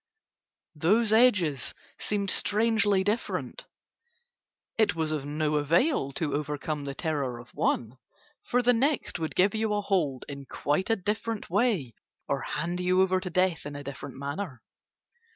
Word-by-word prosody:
Those 210 +8 +3
edges 190 - +3 0.2
seemed 200 -2 -1
strangely 210 -2 +3
different. 230 - -2 1.1
It 220 - +3
was 160 -1 -1
of 145 -2 -3
no 150 0 0
avail 155 - +2
to 145 -1 -2
overcome 150 0 -3
the 140 -1 -5
terror 140 -6 -2
of 120 +1 -13
one, 120 +2 -1 0.4
for 250 0 0
the 245 +1 +5
next 270 -4 0
would 160 -1 -3
give 195 +2 +4
you 220 -1 0
a 205 - 0
hold 170 -10 0
in 140 -1 -8
quite 150 +8 -1
a 225 - +4
different 210 +1 -3
way 195 - +1 0.3
or - - -1
hand 170 +4 -3
you 180 +1 +3
over 185 0 +2
to 185 0 -5
death 180 -3 +1
in 145 - -7
a 145 - -6
different 140 0 -7
manner. 140 - -5
175 Hz, 150 wpm, -28 LUFS, 145-210 Hz, 1.1 s, the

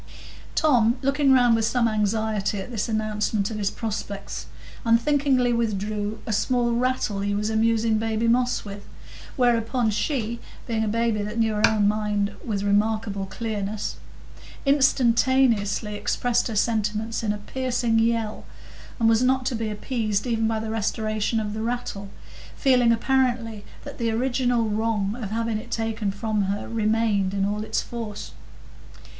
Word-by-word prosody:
Tom, 245 -6 +3
looking 275 0 +3
round 245 -3 +5
with 225 -1 +1
some 235 0 +2
anxiety 215 -1 0
at 195 - -7
this 225 -1 -2
announcement 215 -1 -1
of 215 - -4
his 200 -1 +1
prospects, 205 -3 -5 0.4
unthinkingly 250 +1 +3
withdrew 210 -1 -1
a 220 - -2
small 240 +3 +1
rattle 240 -4 0
he 200 0 -1
was 210 +2 -1
amusing 225 0 +2
baby 225 +1 0
Moss 245 0 +1
with, 200 0 -8 0.5
whereupon 240 -2 +2
she, 235 0 -1 0.3
being 225 -2 -1
a - - -1
baby 225 0 0
that 210 +2 -4
knew 225 -1 +2
her 210 0 +4
own 210 -2 +2
mind 210 -1 0
with 205 -4 -2
remarkable 205 -1 0
clearness, 210 -1 -4 0.7
instantaneously 245 -6 +3
expressed 245 +3 0
her 225 - -4
sentiments 215 0 0
in 215 -2 0
a 210 - -2
piercing 240 +1 0
yell, 225 -1 0 0.6
and 225 - +3
was 225 +1 +4
not 260 0 +2
to 255 - 0
be 225 -1 -2
appeased 215 -1 -2
even 225 -2 0
by 220 -1 0
the 220 0 -4
restoration 215 0 -1
of 210 -1 -3
the 220 - -4
rattle, 225 -4 -3 0.5
feeling 250 -4 +4
apparently 235 -3 0 0.2
that - - -9
the 230 -1 0
original 245 0 +1
wrong 215 -1 0
of 205 - -4
having 225 0 -1
it 235 +2 -11
taken 225 -2 -2
from 205 +1 -1
her 200 +1 -3
remained 215 -3 +1
in 195 -1 +1
all 210 +1 -2
its - - -1
force. 225 -3 -6
225 Hz, 150 wpm, -24 LUFS, 210-235 Hz, 0.7 s, round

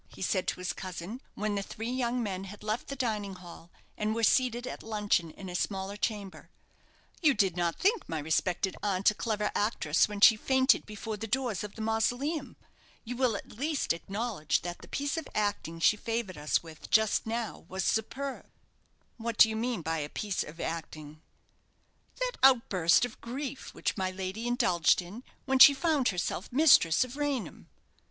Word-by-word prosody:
he - - -14
said 185 -1 0
to - - -2
his 180 - -2
cousin, 185 +6 -7
when 210 0 -1
the 200 - -1
three 225 +4 -5
young 250 -1 -1
men 195 -2 -4
had 205 +2 -11
left 215 +3 -2
the 275 - -5
dining 215 -7 -2
hall, 175 -2 -12 0.3
and 215 +1 -1
were 230 - -2
seated 245 0 +3
at - - -6
luncheon 210 -6 0
in 190 +4 -10
a 180 - -6
smaller 195 +2 -2
chamber. 205 -2 -4 0.7
"You 300 -5 +4
did 195 -5 +2
not 175 -1 0
think 415 +4 +1
my 160 - -2
respected 170 +5 0
aunt 195 -1 +2
a - - -7
clever 210 -1 -1
actress 185 -7 +2
when 205 -1 -5
she 220 +2 +8
fainted 265 +4 +3
before 215 0 -5
the 225 - -5
doors 245 -4 -1
of 210 - -8
the 220 - -5
mausoleum. 245 +7 -1 0.5
You 245 +1 -5
will 250 -3 +1
at - - -7
least 285 - -1
acknowledge 195 -2 -2
that 175 0 -5
the - - -13
piece 285 +2 -2
of 325 - -4
acting 205 -6 -1
she 210 +5 +4
favoured 225 -4 -3
us 150 +2 0
with 160 -2 -12
just 220 0 +3
now 230 0 -4
was 190 +1 -3
superb." 265 +7 -2 0.7
"What 230 -1 -4
do 220 - +8
you 220 - -3
mean 230 -4 -2
by 160 +1 -1
'a 145 -1 -4
piece 205 +2 -2
of 160 +3 -8
acting'?" 155 -2 -6 1.0
"That - - -2
outburst 230 -8 +5
of 245 - -10
grief 265 +3 -6
which - - -2
my 190 -1 0
lady 190 +5 -4
indulged 180 -10 +3
in, 190 +7 -8 0.2
when 265 -1 +1
she 280 +1 +10
found 300 -4 +1
herself 180 0 -2
mistress 255 - +5
of 255 +2 -8
Raynham." 290 -5 -3
215 Hz, 185 wpm, -30 LUFS, 185-245 Hz, 1.0 s, she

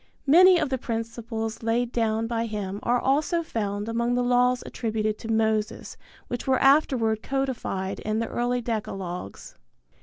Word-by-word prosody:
Many 360 +6 +7
of 310 -4 0
the 260 -1 -1
principles 225 -1 -4
laid 230 +1 0
down 225 -1 0
by 230 0 -2
him 205 -2 -4
are 245 +1 +1
also 300 +6 +1
found 205 -6 -3
among 235 +1 0
the 245 - +1
laws 245 0 +2
attributed 215 -2 -2
to - - -8
Moses 220 -1 0 0.3
which 245 +1 -5
were 260 -1 +3
afterward 260 -6 +3
codified 255 -9 -2
in 215 0 -2
the 230 - 0
early 245 +1 -1
decalogues. 195 - -5
230 Hz, 150 wpm, -25 LUFS, 220-250 Hz, 0.3 s, Many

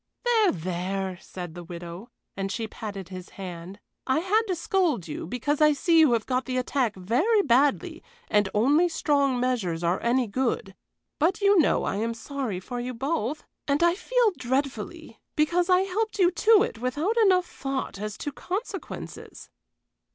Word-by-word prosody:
"There, 450 -4 +4
there!" 185 +2 -3
said 175 -4 -8
the 175 0 -8
widow, 175 +4 -8 0.3
and 195 0 -3
she 225 +3 -3
patted 200 -4 -7
his 185 -1 -8
hand. 185 0 -7 0.3
"I 260 - +2
had 380 +7 +2
to 370 - 0
scold 335 - 0
you, 155 - -5
because 285 - -1
I 300 0 +6
see 330 +3 +3
you 305 -6 +6
have 225 -2 0
got 255 -1 -1
the 255 -1 -2
attack 250 -3 0
very 275 - +2
badly 290 +7 +2 0.3
and 205 -2 +2
only 290 +11 +3
strong 280 -5 +1
measures 215 -10 -1
are 170 +2 +1
any 245 +2 +2
good; 230 -3 -2 0.5
but 330 +5 +2
you 400 -2 +5
know 310 - +3
I 195 - -1
am 230 +2 -1
sorry 250 -6 -4
for 245 +6 -6
you 250 +1 -4
both, 275 +1 -2 0.2
and 285 0 +2
feel 425 +7 +2
dreadfully, 265 +2 -3 0.2
because 345 +4 +2
I 365 0 +5
helped 420 +4 -2
you 365 -3 +4
to 430 +3 +5
it 225 - -4
without 290 - -1
enough 370 -4 +4
thought 270 - -4
as 210 0 -4
to 290 - -4
consequences." 385 - -6
260 Hz, 165 wpm, -26 LUFS, -, 0.5 s, I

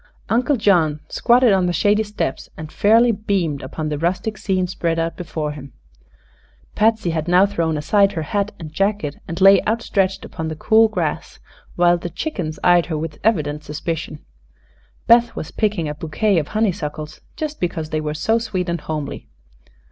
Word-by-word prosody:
Uncle 250 +5 +2
John 170 -8 +2
squatted 240 -2 +4
on 185 -2 +2
the 175 - 0
shady 205 +6 +2
steps 210 -10 -4
and 155 -1 -8
fairly 230 +3 +4
beamed 195 -9 -1
upon 155 +4 -5
the 150 -1 -3
rustic 185 +6 -1
scene 190 -2 -1
spread 170 -2 -2
out 165 0 -1
before 160 -4 -4
him. 140 -3 -10 1.0
Patsy 220 -4 +2
had 160 0 -2
now 180 +2 +5
thrown 165 -6 -1
aside 200 +6 +2
her 160 -4 -3
hat 200 +6 -1
and 155 -3 -9
jacket 195 -5 -1
and 170 +2 -5
lay 195 0 +7
outstretched 200 -4 0
upon 160 - -5
the 160 - -4
cool 220 +7 +4
grass, 215 - -3 0.4
while 175 0 +3
the 175 - -5
chickens 175 - -4
eyed 175 -1 +4
her 160 -3 -2
with 155 0 -5
evident 150 -8 0
suspicion. 155 +1 -5 0.8
Beth 235 0 +4
was 155 - -6
picking 205 -7 -1
a 150 - -3
bouquet 165 +6 0
of 150 - -4
honeysuckles, 155 -8 -3
just 305 -1 -5
because 160 -3 -3
they 155 - -1
were 150 0 -3
so 225 +8 +1
sweet 190 -6 -3
and 170 -2 -2
homely. 150 -3 -5
175 Hz, 170 wpm, -20 LUFS, 155-210 Hz, 1.0 s, lay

